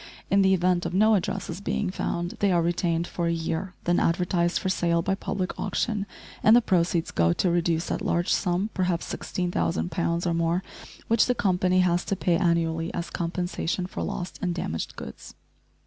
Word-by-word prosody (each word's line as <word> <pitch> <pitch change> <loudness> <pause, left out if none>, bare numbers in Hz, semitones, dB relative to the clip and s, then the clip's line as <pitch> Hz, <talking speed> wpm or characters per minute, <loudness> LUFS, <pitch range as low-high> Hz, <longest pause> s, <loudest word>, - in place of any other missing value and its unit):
In 200 0 +5
the 190 0 +5
event 180 0 +1
of - - -4
no 215 +3 +5
addresses 180 -2 -2
being 200 -1 -1
found 175 -2 -2
they 200 -1 +3
are 170 -2 +3
retained 170 0 0
for 170 -1 -2
a - - +2
year, 165 +3 -3
then 175 0 +2
advertised 175 0 +1
for - - -2
sale 170 -2 +1
by 190 - +1
public 195 -1 -3
auction, 210 -4 -1 0.3
and 215 - +7
the - - +8
proceeds 170 -4 +1
go 85 0 +3
to 180 - +1
reduce 170 -1 0
that - - -2
large 175 +1 +1
sum 185 +3 0
perhaps 180 -3 0
16,000 85 - -2
poundss 170 +1 -1
or 170 - +1
more 170 +2 +1 0.4
which 230 -1 +4
the 250 - +2
company 185 -3 +2
has 175 -1 +2
to 195 - -1
pay 175 -2 +1
annually 165 -1 +1
as 170 -1 -4
compensation 175 +1 -2
for 185 - -6
lost 175 0 -4
and 180 -2 -1
damaged 80 - -4
goods. - - -9
175 Hz, 185 wpm, -26 LUFS, 170-185 Hz, 0.4 s, the